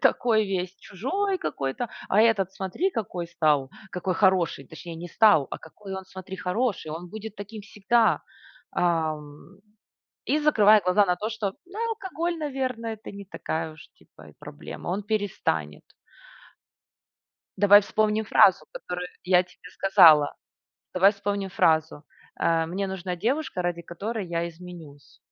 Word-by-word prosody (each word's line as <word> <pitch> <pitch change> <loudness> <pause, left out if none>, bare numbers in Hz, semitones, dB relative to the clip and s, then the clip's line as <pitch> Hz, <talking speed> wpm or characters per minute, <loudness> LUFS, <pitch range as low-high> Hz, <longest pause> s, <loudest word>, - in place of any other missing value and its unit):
такой 220 -3 +3
весь 185 -1 -3
чужой 380 - -2
какой-то, 135 - -3 0.2
а 205 - +4
этот, 215 -5 +3
смотри, 195 - -2
какой 185 - -4
стал, 150 -5 +1 0.2
какой 180 +1 -2
хороший. 180 -7 +2
Точнее 165 +3 -9
не 170 +2 -8
стал, 205 - +5
а - - -5
какой 195 +4 -10
он 190 0 -6
смотри, 190 0 -9
хороший. 180 -1 -2
Он 170 +3 -6
будет 220 +1 -8
таким 205 +2 -8
всегда". 220 +3 +2 0.5
Ам, 155 0 -2 0.7
и, 295 - +2
закрывая 215 -9 +5
глаза 180 +3 +4
на 180 -1 +1
то, 210 +4 -3
что, 220 -3 -2
да, 375 +3 -11
алкоголь, 350 -6 -3
наверно, 260 -6 -3
это 220 -1 -7
не 200 0 -9
такая 160 -4 -4
уж 155 - -15
типа - - -18
и - - -24
проблема. - - -9
Он 190 +4 -1
перестанет. 195 - -2 1.7
Давай 205 +1 +8
вспомним 215 +1 0
фразу, 185 -5 +5
которую 180 0 -5 0.2
я 180 -1 +4
тебе 180 0 -16
сказала. 160 -6 +6 0.6
Давай 195 +3 +5
вспомним 200 -1 -3
фразу: 160 -3 +1 0.4
"Э, 165 -1 +2
мне 195 +4 -3
нужна 185 -1 -4
девушка, 235 - -1
ради 175 -1 -2
которой 200 +5 -5
я 170 0 -2
изменюсь". 165 -4 -13
190 Hz, 140 wpm, -26 LUFS, 170-215 Hz, 1.7 s, Давай